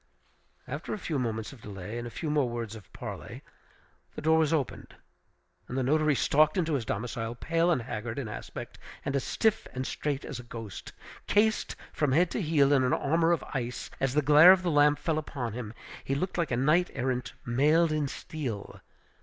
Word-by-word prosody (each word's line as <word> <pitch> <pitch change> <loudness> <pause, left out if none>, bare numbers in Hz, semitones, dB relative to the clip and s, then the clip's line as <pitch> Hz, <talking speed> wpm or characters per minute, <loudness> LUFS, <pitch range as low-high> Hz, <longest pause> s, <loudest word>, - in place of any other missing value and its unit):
After 145 +10 -4
a - - -6
few 160 -7 -2
moments 110 -1 -3
of 125 - -15
delay 105 +3 -6
and 120 - -5
a - - -5
few 150 +5 -4
more 145 -4 +2
words 115 -2 -4
of 105 -5 -13
parley, - - -8 0.7
the - - -5
door 160 +1 +4
was 155 -2 +2
opened, 150 -5 -2 0.7
and 125 - -4
the 130 - +1
notary 155 +2 +3
stalked 155 +5 +3
into 165 -3 +1
his 130 -6 -1
domicile, 115 +2 -3
pale 165 +6 +1
and 145 -9 +2
haggard 115 0 -5
in 135 -5 -3
aspect, 105 - -8 0.3
and 140 - -1
as 140 - 0
stiff 220 -1 +1
and 130 +1 -2
straight 145 0 -2
as - - -6
a - - -8
ghost. 115 -4 -8 0.4
Cased 215 +1 +2 0.2
from 145 -4 +1
head 170 +4 +3
to - - -1
heel 150 -4 +3
in 135 -2 +4
an 125 - +2
armor 165 +4 +2
of 170 - +1
ice, 125 -2 -4
as 135 0 0
the 150 - +3
glare 150 +5 +9
of 190 -1 +4
the 175 - +1
lamp 145 0 +5
fell 160 -2 0
upon 125 -7 -4
him, 115 -3 -5 0.3
he 135 - -1
looked 180 +6 -2
like 170 -4 0
a 120 - 0
knight 155 +7 +3
errant 125 -1 -2
mailed 150 +7 +3
in 155 -2 0
steel. 130 -8 -6
140 Hz, 205 wpm, -29 LUFS, 120-155 Hz, 0.7 s, glare